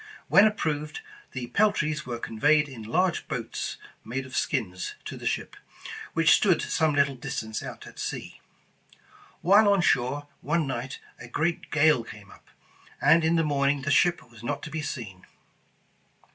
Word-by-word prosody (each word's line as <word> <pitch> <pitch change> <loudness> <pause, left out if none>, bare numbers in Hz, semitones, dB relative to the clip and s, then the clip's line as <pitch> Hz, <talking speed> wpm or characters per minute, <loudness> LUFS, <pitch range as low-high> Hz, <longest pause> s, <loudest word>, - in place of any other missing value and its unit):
When 200 +2 +7
ap 210 -1 -2
proved, 150 - -2 0.3
the 125 - -4
peltries 155 -9 +1
were 120 -1 -3
conveyed 145 +7 +2
in 130 -5 -9
large 170 +11 0
boats 125 -7 -4 0.3
made 130 +3 -4
of 130 - -9
skins 90 -10 -2
to - - -6
the - - -5
ship, - - -2 0.6
which 165 -1 +4
stood 190 -5 +4
some 155 -2 +1
little 140 -1 +3
distance 110 -3 -4
out - - -8
at - - -12
sea. - - -5 1.0
While 205 +3 +6
on 200 -2 +3
shore 135 -1 +1 0.2
one 160 +1 0
night, 135 0 -4 0.2
a 120 - -9
great 170 +7 -1
gale 150 -5 +4
came 105 -3 -12
up, - - -18 0.5
and 160 +4 +5
in 160 +1 +3
the 165 - +3
morning 140 -2 +1
the - - 0
ship 175 0 +3
was 115 -2 -16
not 140 +4 -3
to 150 - -7
be 160 0 -3
seen. 105 -10 -6
145 Hz, 165 wpm, -27 LUFS, 120-165 Hz, 1.0 s, When